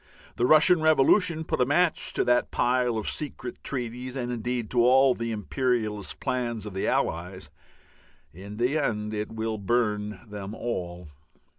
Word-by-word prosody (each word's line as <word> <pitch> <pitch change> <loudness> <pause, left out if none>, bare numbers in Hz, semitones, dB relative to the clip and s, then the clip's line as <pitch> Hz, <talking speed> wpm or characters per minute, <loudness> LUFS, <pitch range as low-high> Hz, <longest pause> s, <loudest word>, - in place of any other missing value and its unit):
The 120 - +1
Russian 155 +3 +6
revolution 160 +2 +3
put 140 - -2
a - - +4
match 170 +3 +2
to - - +1
that 125 0 +2
pile 125 -1 +1
of 110 - -4
secret 135 -5 -4
treaties 125 0 -4
and 125 -2 -3
indeed 120 -1 -3
to 120 -1 +3
all 130 +1 +5
the 115 -1 -4
imperialist 110 -1 -2
plans 120 -4 -2
of 105 - -7
the 95 - -2
Allies; 90 +3 -2 0.8
in 100 +5 -10
the 125 +6 +1
end 105 -6 -2
it 105 0 -4
will 110 -1 -3
burn 105 -2 -1
them 105 0 -7
all. 90 -8 -5
120 Hz, 155 wpm, -26 LUFS, 105-130 Hz, 0.8 s, Russian